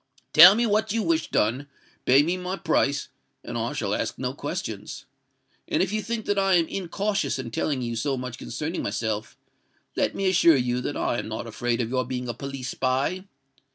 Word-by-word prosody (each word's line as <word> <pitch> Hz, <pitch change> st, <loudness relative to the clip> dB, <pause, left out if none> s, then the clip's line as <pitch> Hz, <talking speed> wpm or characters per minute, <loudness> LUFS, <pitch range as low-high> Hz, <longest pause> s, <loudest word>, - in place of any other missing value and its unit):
"Tell -, -, +10 dB
me 235 Hz, +2 st, +2 dB
what 215 Hz, 0 st, +1 dB
you 225 Hz, 0 st, 0 dB
wish 165 Hz, -3 st, 0 dB
done—pay 135 Hz, +3 st, +1 dB
me 170 Hz, +4 st, 0 dB
my 185 Hz, +1 st, -4 dB
price—and 140 Hz, -6 st, -2 dB
I -, -, -2 dB
shall -, -, -2 dB
ask -, -, -2 dB
you -, -, -7 dB
no -, -, -1 dB
questions. -, -, -5 dB, 0.6 s
And 165 Hz, -, +1 dB
if 195 Hz, +2 st, -3 dB
you 215 Hz, -, 0 dB
think 230 Hz, 0 st, -4 dB
that 205 Hz, -1 st, +1 dB
I 195 Hz, -1 st, +3 dB
am 165 Hz, -2 st, +3 dB
incautious 195 Hz, +1 st, -2 dB
in 125 Hz, -3 st, -6 dB
telling 130 Hz, +2 st, -1 dB
you 120 Hz, -1 st, -3 dB
so 135 Hz, +4 st, -1 dB
much 125 Hz, 0 st, -6 dB
concerning 160 Hz, +4 st, -4 dB
myself, 110 Hz, +1 st, -3 dB, 0.6 s
let -, -, 0 dB
me 195 Hz, -, 0 dB
assure 170 Hz, -4 st, +5 dB
you 125 Hz, 0 st, 0 dB
that 145 Hz, -, -3 dB
I 120 Hz, -, 0 dB
am -, -, -5 dB
not 110 Hz, +1 st, -5 dB
afraid 120 Hz, +2 st, -1 dB
of 115 Hz, -, -2 dB
your 130 Hz, -1 st, +1 dB
being 125 Hz, 0 st, -4 dB
a 120 Hz, -, -2 dB
police 135 Hz, 0 st, -6 dB
spy. 135 Hz, +11 st, -1 dB
140 Hz, 195 wpm, -25 LUFS, 125-185 Hz, 0.6 s, Tell